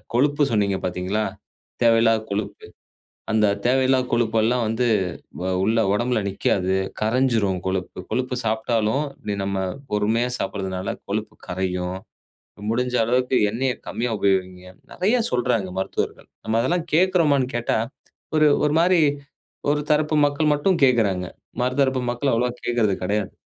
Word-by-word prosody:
கொழுப்பு 145 +3 +3
சொன்னீங்க 100 -2 +1
பார்த்தீங்களா, 90 +4 -1 0.6
தேவையில்லாத 115 -1 +4
கொழுப்பு. 100 0 -4 0.7
அந்த 110 -1 +3 0.2
தேவையில்லாத 130 +1 +3
கொழுப்பு 115 -1 +1
எல்லாம் 120 +1 +1
வந்து 115 +3 0 0.6
அ - - 0
உள்ள 110 +3 +2 0.2
உடம்புல 120 +1 +1
நிக்காது. 95 -1 0 0.3
கரைஞ்சிரும் 110 -5 +1
கொழுப்பு. 95 -1 -3
கொழுப்பு 125 0 -1
சாப்ட்டாலும் 110 +4 0 0.4
நம்ம 100 0 -2 0.4
பொறுமையா 110 +4 +1
சாப்பட்றதுனால் 95 -1 -3 0.2
கொழுப்பு 105 +1 -3
கரையும். 90 0 -2 0.7
முடிஞ்ச 125 +2 0
அளவுக்கு 125 +2 +1
எண்ணெயக் 125 +3 -2
கம்மியா 120 0 -2
உபயோகியுங்க. 95 -2 -1 0.2
நிறைய 215 +7 +1
சொல்றாங்க, 120 -6 0
மருத்துவர்கள். 95 - -3 0.2
நம்ம 110 +1 0
அதெல்லாம் 170 +6 0
கேட்கறோமான்னு 160 -7 +3
கேட்டா, 120 - 0 0.6
ஒரு 155 -1 +5 0.2
ஒரு 150 +1 +1
மாரி 175 0 +4 0.7
ஒரு 150 - +1
தரப்பு 150 +1 +2
மக்கள் 150 +1 +1
மட்டும் 170 +5 +1
கேட்கறாங்க. 105 -8 +2 0.4
மர 125 +1 +1
தரப்பு 130 -1 +2
மக்கள் 130 +3 0
அவ்வளவா 120 +1 +1
கேட்கறது 115 -5 +2
கிடையாது. 100 +1 -1
115 Hz, 125 wpm, -23 LUFS, 100-130 Hz, 0.7 s, ஒரு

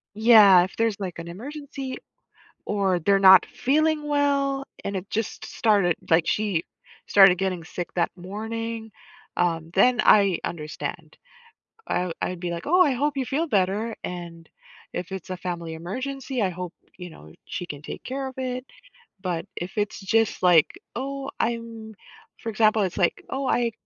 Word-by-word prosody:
yeah, 210 -5 +7
if 185 - -6
there's, 225 -3 0
like, 185 -4 -5
an 170 0 -7
emergency 275 - -7 0.7
or 195 -3 0
they're 195 +4 +3
not 190 -1 +8
feeling 300 +2 +1
well 280 -1 +1 0.2
and 200 - -3
it 190 +1 -5
just 225 -1 -3
started, 200 -6 +2 0.2
like, 165 0 +4
she 200 -6 0 0.4
started 195 -3 +6
getting 185 -3 -2
sick 175 +1 -6
that 170 - +1
morning, 220 +4 -5 0.4
um, 165 -2 0
then 245 +5 +4
I 200 -4 +5
understand. 155 -3 -6 0.7
I 180 -1 -1
I'd 180 -1 -3
be, 175 -1 -3
like, 170 +10 -5
"Oh, 360 +3 +5
I 295 -6 +5
hope 285 +3 0
you 265 -2 -1
feel 310 +6 -1
better." 205 +1 0
And 170 -2 -7 0.4
If 180 +1 -5
it's 190 -1 -7
a 185 - -4
family 170 -3 -5
emergency, 260 +8 -4
I 190 - +2
hope 180 0 -6 0.2
you 180 -1 -8
know 80 - -14
she 180 - -5
can 145 -3 -8
take - - -8
care 265 +1 -4
of 260 - -9
it, 255 0 -3 0.6
but 175 -4 -3
if 175 +4 -6
it's 205 0 -1
just, 220 +1 +1
like, 170 -4 +5 0.2
"Oh, 275 +2 -4
I'm" 230 -2 -3 0.5
For 230 - -4
example, 215 -1 +3
it's 185 0 -3
like, 175 -3 0
"Oh, 270 0 -2
I 240 -2 +1
205 Hz, 165 wpm, -25 LUFS, 180-250 Hz, 0.7 s, not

